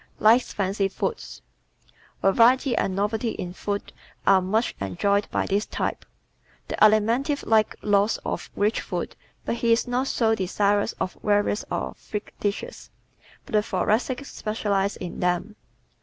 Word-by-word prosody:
Likes 230 +4 +4
Fancy 195 0 0
Foods 445 - -4 0.8
¶ 195 - +4
Variety 250 +3 +4
and 190 - 0
novelty 220 +3 -1
in 180 -1 -5
food 200 +1 -4 0.3
are 195 -1 +6
much 215 +6 0
enjoyed 200 - 0
by - - 0
this 200 +2 0
type. - - -3 0.6
The - - -2
Alimentive 230 +7 +3
likes 220 -1 +3
lots 205 +1 +3
of - - -4
rich 210 +2 +1
food - - -4 0.3
but 235 - -1
he 235 -1 +1
is 230 +2 +3
not 250 +2 0
so 225 -4 +2
desirous 205 +1 +1
of 185 - -4
varieties 205 0 +1
or - - -3
freak 210 -1 -7
dishes. 210 - -4 0.6
But - - -13
the 210 - +5
Thoracic 220 +7 0
specializes 205 -4 -1
in 180 -2 -6
them. 180 +4 -1
210 Hz, 145 wpm, -25 LUFS, 200-230 Hz, 0.8 s, are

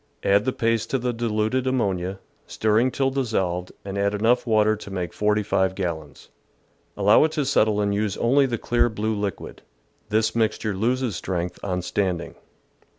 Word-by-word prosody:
Add 100 +2 +3
the 130 - +1
paste 115 -2 0
to 135 - +1
the 125 -1 -2
diluted 115 +2 -1
ammonia, 95 -7 -1 0.3
stirring 110 +4 +2
till 135 +1 0
dissolved, 95 -9 -1
and 100 0 -4
add 100 +1 +1
enough 120 +4 +2
water 110 -1 +3
to 105 - -10
make 90 -3 -4
45 105 -3 +1
gallons. 80 -6 -5 0.7
Allow 105 +5 +5
it 160 - -2
to 150 - 0
settle 110 -6 +2
and 100 -1 +1
use 105 -1 -1
only 135 +4 +3
the 120 -2 -2
clear 120 +1 +1
blue 110 0 -2
liquid. 100 -3 -5 0.5
This 110 +1 +1
mixture 110 -2 0
loses 120 +1 0
strength 90 0 -3
on 90 -2 -2
standing. 90 -2 -2
105 Hz, 160 wpm, -24 LUFS, 95-120 Hz, 0.7 s, Allow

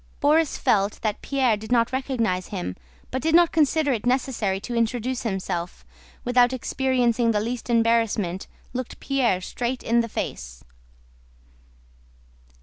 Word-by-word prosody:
Borís 305 +2 +3
felt 200 0 +1
that 215 -2 -1
Pierre 260 -5 +1
did 220 +3 -9
not 235 0 +3
recognize 235 -9 -1
him 180 - -4 0.4
but 260 - -2
did 320 +1 +2
not 345 -1 +6
consider 305 -2 +2
it 230 0 -3
necessary 245 -7 0
to 240 - -6
introduce 240 +2 -1
himself, 185 -5 -3
and - - -26
without 245 0 +4
experiencing 250 -2 +1
the 215 -2 +2
least 235 +3 -4
embarrassment 225 -5 +1 0.3
looked 255 -1 -5
Pierre 250 -9 +1
straight 245 +6 -3
in 235 +1 +2
the 230 0 0
face. 60 - -5
235 Hz, 140 wpm, -24 LUFS, 210-260 Hz, 0.4 s, not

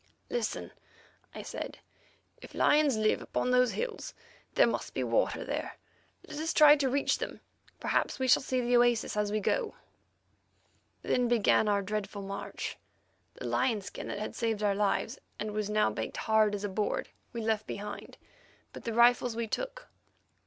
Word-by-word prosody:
"Listen," 485 - -2 0.6
I - - -6
said; - - -6 0.6
"if - - -12
lions 295 -5 +4
live 215 0 +2
upon 250 - -1
those 250 -1 +4
hills, 475 -2 -4 0.4
there - - +6
must - - -3
be - - 0
water - - +1
there. - - -4 0.5
Let 300 -1 -6
us 320 +1 -1
try 300 -1 +9
to 275 -2 +1
reach 280 +2 +1
them; - - -5 0.4
perhaps - - 0
we 260 -1 -1
shall 255 - +6
see 255 -1 -1
the 245 0 +2
oasis 240 -3 +2
as 210 -1 0
we 215 - +1
go." 460 - 0 1.3
Then 250 -1 +1
began 230 -2 +3
our 200 -1 +2
dreadful 205 0 -4
march. 195 0 -5 0.6
The - - -8
lion 235 -5 +1
skin 195 - -7
that - - -4
had 210 - -4
saved 225 -3 -1
our 205 -1 +3
lives, 210 +5 0 0.2
and 215 0 -3
was 210 0 -2
now 210 - +2
baked 110 +1 -4
hard 215 -1 +3
as 200 - -5
a 205 - -1
board, 215 - -1 0.2
we 235 - -4
left 220 -1 0
behind, 205 +1 -7 0.6
but - - -10
the 230 - -2
rifles 240 0 +4
we 230 0 -1
took. - - -4
225 Hz, 170 wpm, -30 LUFS, 210-260 Hz, 1.3 s, try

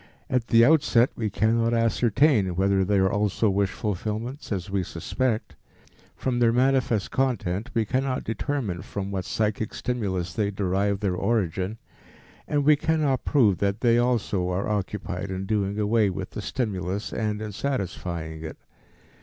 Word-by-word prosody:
At 125 -2 +1
the 115 0 +6
outset 140 -5 +4
we 110 -2 -2
cannot 115 +3 +1
ascertain 115 - +2
whether 95 +1 +2
they 100 +2 +1
are 95 0 +3
also 105 +1 +1
wish 100 0 +1
fulfillments, 110 - -4
as 95 -2 -2
we 100 -1 +1
suspect; 110 - -2 0.6
from 125 -2 -1
their 115 -1 +4
manifest 125 -3 +1
content 115 -6 -1
we 115 -1 +2
cannot 130 +4 -1
determine 115 - -2
from 100 -1 -5
what 95 -3 -3
psychic 110 0 -1
stimulus 95 -9 -2
they 100 +3 0
derive 100 +1 0
their 100 -3 0
origin, 95 -1 -1 0.7
and 145 -1 0
we 150 0 +7
cannot 150 -3 0
prove 110 - +3
that 100 +2 0
they 120 -1 +4
also 110 -7 0
are 90 +2 -1
occupied 100 -2 -3
in 95 0 -3
doing 100 -1 -1
away 105 0 +2
with 90 - -5
the - - -5
stimulus 100 -5 -3
and 105 -1 -1
in 110 -1 -5
satisfying 90 - -4
it. 80 - -7
105 Hz, 155 wpm, -25 LUFS, 95-120 Hz, 0.7 s, we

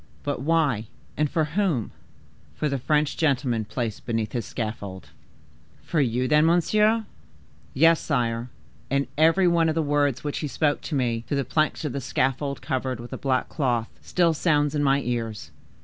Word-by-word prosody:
But 145 -3 -2
why 140 -8 +1 0.3
and 150 -1 +1
for 160 0 +1
whom?" 155 - 0 0.6
"For 155 - -1
the 140 -2 -1
French 150 +3 +1
gentleman 130 -7 +1
placed 115 -1 -4
beneath 115 -2 -2
his 120 -3 -3
scaffold." 105 -4 -5 0.7
"For 160 - 0
you, 125 0 0
then, 150 +1 +4
monsieur?" 215 +6 +3 0.7
"Yes, 165 +3 +5
sire; 120 -4 -1 0.4
and 140 +1 +1
every 165 +5 +4
one 170 -1 +3
of 155 - -1
the 165 - +1
words 145 -3 +1
which 145 -1 -3
he 150 - -2
spoke 145 +1 0
to 155 - -4
me, 120 -4 0
through 145 - -1
the 140 - 0
planks 155 +4 0
of 145 - -2
the 140 - -3
scaffold 135 +3 -1
covered 130 -3 -2
with 120 +1 -8
a - - -4
black 130 -2 0
cloth, 120 -6 -1
still 170 -2 +2
sounds 150 -2 +1
in 150 - 0
my 140 0 +3
ears. 115 -4 -4
140 Hz, 175 wpm, -25 LUFS, 120-155 Hz, 0.7 s, Yes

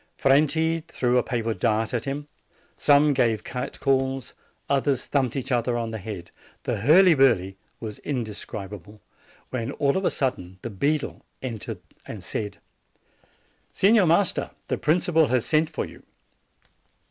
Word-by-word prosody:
Franti 155 +4 +3
threw 125 -4 +1
a - - +3
paper 115 -2 -2
dart 110 +2 0
at 120 0 -1
him; 145 +1 -4 0.5
some 145 0 +4
gave 115 -5 +1
cat 125 -1 -5
calls; 135 -1 0 0.3
others 140 -2 +1
thumped 130 -5 0
each 135 0 -4
other 120 0 +1
on 115 -1 -3
the 110 - -4
head. 95 -4 -7 0.3
The - - -1
hurly 170 - +6
burly 115 - +3 0.2
was 110 -2 -7
indescrib 105 -6 -5
able; 105 +2 -11 0.5
when, 115 -3 -2
all 140 -1 +1
of 190 - 0
a - - +3
sudden, 95 -9 -2
the 120 - -4
beadle 145 +9 -1 0.2
entered 115 -6 -5 0.3
and - - -7
said: 105 -1 -4 1.1
"Signor 200 -1 +4
Master, 175 +4 +2 0.2
the - - 0
principal 160 0 +3
has 125 -2 +1
sent 155 0 +2
for - - -3
you." - - -13
130 Hz, 145 wpm, -25 LUFS, 110-145 Hz, 1.1 s, hurly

